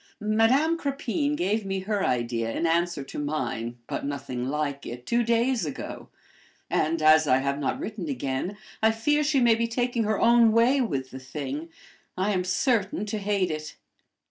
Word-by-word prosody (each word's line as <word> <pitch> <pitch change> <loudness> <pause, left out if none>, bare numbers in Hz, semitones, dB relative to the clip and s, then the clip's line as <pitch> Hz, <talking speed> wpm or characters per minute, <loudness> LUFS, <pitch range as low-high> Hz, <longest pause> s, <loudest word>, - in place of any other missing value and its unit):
"Madame 230 +10 +3
Crepine 285 +1 -1
gave 210 0 0
me 195 -1 -2
her 205 +1 -1
idea, 120 -2 0
in 165 - -1
answer 170 -2 +1
to 135 - -7
mine, 125 -5 -3
but - - -4
nothing 130 -3 -4
like 145 -1 -2
it, 120 +1 -8
two 240 +1 +2
days 235 0 +1
ago; 150 -3 -6 0.6
and, 155 0 +1
as 155 0 +6
I 130 - +5
have 140 +1 -1
not 140 - -1
written 205 -7 -5
again, 135 +8 -3 0.2
I 220 - +5
fear 295 +7 +1
she 290 -2 +2
may 240 -2 +5
be 230 +1 0
taking 240 -1 0
her 215 -1 0
own 235 -1 +5
way 245 +4 +4
with 135 - -2
the 130 - -7
thing. 140 +4 -5 0.5
I 190 +3 +1
am 185 -2 0
certain 205 +1 0
to 210 +1 -3
hate 200 -3 0
it." 155 0 -6
190 Hz, 175 wpm, -26 LUFS, 145-230 Hz, 0.6 s, as